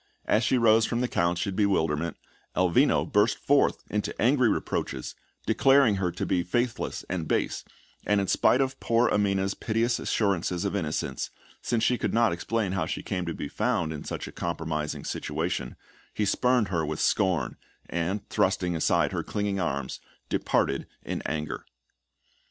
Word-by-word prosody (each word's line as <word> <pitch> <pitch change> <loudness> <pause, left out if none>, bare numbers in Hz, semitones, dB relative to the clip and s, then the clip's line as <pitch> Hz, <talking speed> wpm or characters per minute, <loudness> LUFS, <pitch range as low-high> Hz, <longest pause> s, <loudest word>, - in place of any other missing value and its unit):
As 110 - +2
she 130 - +3
rose 115 -1 +5
from 120 0 -1
the 125 - +1
couch 85 -4 0
in 100 -2 -3
bewilderment, 85 -6 +1 0.4
Elvino 90 -2 +3
burst 105 +2 +2
forth 145 0 +2
into 105 -1 -3
angry 125 0 +4
reproaches, - - -2 0.3
declaring 135 -6 +4
her 90 -2 0
to - - -3
be 90 - +1
faithless 120 +7 -2
and 85 -4 -3
base; - - 0 0.4
and 105 0 +3
in 100 - 0
spite 125 +6 +3
of 130 0 -1
poor 115 +1 +2
Amina's 100 -1 +1
piteous 115 +4 0
assurances 90 -3 0
of 100 - -1
innocence, 80 -6 -2 0.3
since 115 -2 0
she 125 - +2
could - - -1
not 115 -5 +4
explain 105 +3 -1
how 90 -4 -1
she - - -4
came 90 -3 -3
to 85 - -2
be - - -4
found 105 -5 0
in 75 - -6
such - - -5
a - - -8
compromising 80 -3 -3
situation, 60 - -3 0.4
he 105 - +1
spurned 125 0 +2
her 85 -4 0
with 75 0 -3
scorn, 90 -10 +1 0.3
and, 85 +4 -2
thrusting 90 -1 +1
aside 80 - +2
her - - -1
clinging 100 -1 -2
arms, 70 -6 -2 0.3
departed - - 0 0.2
in - - -3
anger. 75 0 -3
100 Hz, 165 wpm, -27 LUFS, 85-115 Hz, 0.4 s, rose